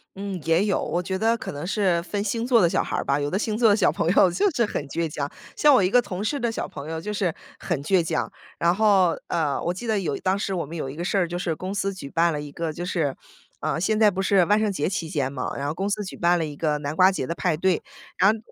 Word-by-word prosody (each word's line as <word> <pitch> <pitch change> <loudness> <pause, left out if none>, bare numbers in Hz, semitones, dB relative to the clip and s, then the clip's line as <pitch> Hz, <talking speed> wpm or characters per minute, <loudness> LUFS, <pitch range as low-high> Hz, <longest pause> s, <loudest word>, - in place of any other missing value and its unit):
嗯， 195 -2 -5
也 165 +4 +2
有， 210 - +1
我 175 +1 -1
觉 190 +1 -2
得 225 +2 +2
可 - - -6
能 145 +2 -6
是 185 -3 +1
分 200 +4 -3
星 225 +3 -1
座 245 -2 +4
的 175 - +5
小 - - +1
孩 - - -3
儿 - - -2
吧， 140 +1 +1
有 145 0 -1
的 185 - -1
星 215 +1 -1
座 230 -1 +5
的 205 - +5
小 210 - +3
朋 165 - -1
友 180 0 +5
就 185 - +2
是 240 -5 +1
很 205 - -3
倔 165 +2 -1
强， 145 -2 -4 0.3
像 295 -1 +5
我 250 - +5
一 185 - +2
个 245 +1 +5
同 200 -2 -5
事 280 +7 -1
的 235 -1 0
小 - - -4
朋 140 +2 -8
友 160 0 -3
就 210 +6 -5
是 190 -5 0 0.3
很 170 -6 -2
倔 185 +2 +3
强。 160 - -2 0.3
然 170 +1 +3
后， 195 -5 +4
呃， 155 -5 0
我 170 - 0
记 190 +7 -7
得 220 -3 +1
有 170 -7 -2
一 - - -11
当 190 +1 +1
时 200 -1 -2
我 170 - -2
们 160 +4 -9
有 150 -5 -4
一 135 - -8
个 170 - -4
事 200 - 0
儿 180 -3 +2
就 175 +1 -4
是 175 -2 -2
公 185 +4 -5
司 195 0 -1
举 145 -7 -8
办 165 +3 +2
了 150 - -3
一 145 -1 -8
个 165 +1 -3
就 175 - -6
是 165 -7 -1 0.4
呃， - - -1
现 215 +5 +1
在 215 -1 +6
不 190 -1 -5
是 195 -1 +4
万 210 +4 +3
圣 215 -1 +1
节 170 -5 -1
期 175 -3 -3
间 140 -5 -1
嘛， 130 -2 -4
然 140 - -3
后 145 - -1
公 195 +3 -2
司 205 +1 -1
举 190 - -8
办 175 0 +3
了 160 - 0
一 150 - -7
个 150 -1 0
南 145 +1 -4
瓜 185 +2 +6
节 135 -9 -3
的 170 - -3
派 175 -2 0
对。 180 +2 +1 0.3
然 195 +2 +5
后 - - -5
180 Hz, 325 characters per minute, -24 LUFS, 160-200 Hz, 0.4 s, 在